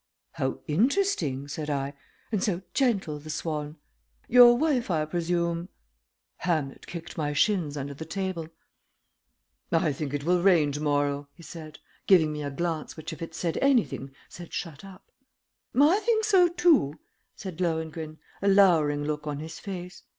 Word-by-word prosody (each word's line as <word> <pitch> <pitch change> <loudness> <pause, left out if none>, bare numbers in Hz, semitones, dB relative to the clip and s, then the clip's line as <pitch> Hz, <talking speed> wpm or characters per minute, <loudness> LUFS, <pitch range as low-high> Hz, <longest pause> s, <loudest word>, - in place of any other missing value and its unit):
"How 130 0 -3
interesting!" 175 - +1
said 150 +1 -5
I. 140 -1 -2 0.4
"And 210 -4 0
so 185 -3 -1
gentle, 200 - +1
the 155 +2 -11
swan. 150 -1 -3 0.5
Your 240 0 +8
wife, 275 -6 +1
I 155 -3 +1
presume 170 +1 -1 0.3
" - - -56 0.3
Hamlet 155 -6 -2
kicked 170 0 -7
my 150 -1 -1
shins 160 -3 +1
under 140 0 -4
the 145 - -7
table. 180 -1 -3 1.2
"I 165 -3 +2
think 145 0 -4
it 140 - -3
will 175 +2 +2
rain 170 -6 +4
to 145 +1 -4
morrow," 145 -1 0
he 170 - -15
said, 155 -1 -9 0.3
giving 160 -6 +5
me 150 - -4
a 145 - -3
glance 160 +2 -3
which 160 +2 -6
if 160 - -11
it 165 -1 -6
said 170 -1 -2
anything 245 - +2 0.2
said 175 -1 -11
shut 165 -4 -5
up. 195 -1 -14 0.7
"I 315 +8 +6
think 440 0 +1
so, 380 -5 +5
too," 335 - +3 0.4
said 185 -3 -7
Lohengrin, 160 -2 -2 0.2
a 200 - 0
lowering 165 -7 +4
look 150 0 -3
on 145 -1 -2
his 160 +2 -7
face. 180 -2 -7
165 Hz, 160 wpm, -27 LUFS, 150-195 Hz, 1.2 s, Your